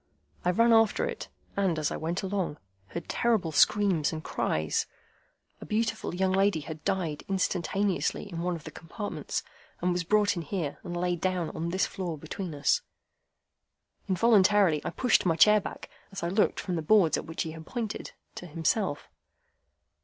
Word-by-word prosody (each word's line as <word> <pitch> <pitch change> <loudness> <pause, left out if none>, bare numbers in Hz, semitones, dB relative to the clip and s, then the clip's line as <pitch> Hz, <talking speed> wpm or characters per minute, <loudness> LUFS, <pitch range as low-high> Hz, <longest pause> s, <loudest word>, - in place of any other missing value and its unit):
I 180 - +2
ran 230 +6 +4
after 225 - +4
it, - - -5 0.3
and, 190 -5 +1
as 155 -1 0
I - - -2
went 170 +4 -3
along, 190 -5 -2 0.3
heard 170 - -6
terrible 220 -9 +1
screams 190 -2 +3
and 155 0 -5
cries. 80 - -1 0.7
A - - -7
beautiful 225 -3 -1
young 190 +1 +1
lady 195 -3 +2
had 155 +1 -8
died 180 -7 -1
instantaneously 190 0 0
in 170 -4 -5
one 180 0 -1
of 160 - -9
the - - -8
compartments, 205 +5 -5 0.4
and 180 +1 +1
was 180 0 0
brought 210 +4 +3
in 170 - -3
here, 165 -2 -3
and 175 0 -5
laid 175 -1 -1
down 185 -3 0
on 165 +1 -3
this 185 +3 +1
floor 175 -4 -4
between 160 +2 -6
us." 145 - +2 1.3
Involuntarily 195 -4 +4
I - - -2
pushed 250 -3 +2
my 170 -3 +2
chair 210 +6 +7
back, - - -7 0.2
as 195 -2 -6
I 170 - 0
looked 205 +4 +2
from 180 -3 -2
the - - -1
boards 175 0 +4
at - - -4
which 160 - -3
he 160 0 -6
pointed 220 +6 -5 0.2
to 180 - -8
himself. 165 +1 -1
180 Hz, 170 wpm, -28 LUFS, 165-205 Hz, 1.3 s, chair